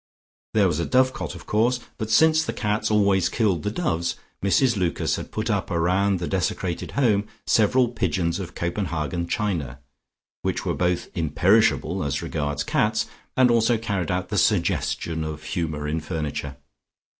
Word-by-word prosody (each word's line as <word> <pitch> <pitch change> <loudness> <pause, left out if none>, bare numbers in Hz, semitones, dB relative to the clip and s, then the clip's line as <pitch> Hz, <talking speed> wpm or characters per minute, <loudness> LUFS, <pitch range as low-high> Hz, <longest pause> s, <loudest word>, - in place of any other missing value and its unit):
There 105 -3 +5
was 85 -3 0
a 85 - 0
dovecote 130 +3 +1
of - - -11
course, 120 +4 +2 0.2
but 110 -1 -3
since 160 +7 +5
the - - -3
cats 105 +1 -1
always 100 -4 +3
killed 100 -8 +1
the 105 - -1
doves, 85 - -1 0.3
Mrs 120 +5 +3
Lucas 90 -4 0
had - - -7
put - - -3
up - - -1
round 95 +4 +2
the 85 - -3
desecrated 90 -2 -2
home 105 -6 +2 0.2
several 120 +4 +3
pigeons 95 -7 -1
of 90 -2 -7
Copenhagen 85 -2 -2
china, 85 - -2 0.6
which - - -2
were - - 0
both 90 0 0
imperishable 90 +2 +2
as 70 -2 -2
regards 75 -2 -2
cats, - - +1 0.3
and 130 -2 +5
also 115 0 +3
carried 100 -6 -2
out 90 0 -1
the - - +1
suggestion 80 -1 0
of 75 -1 -6
humour 80 -4 -3
in 80 +2 -1
furniture. 75 -3 -4
95 Hz, 155 wpm, -24 LUFS, 85-110 Hz, 0.6 s, There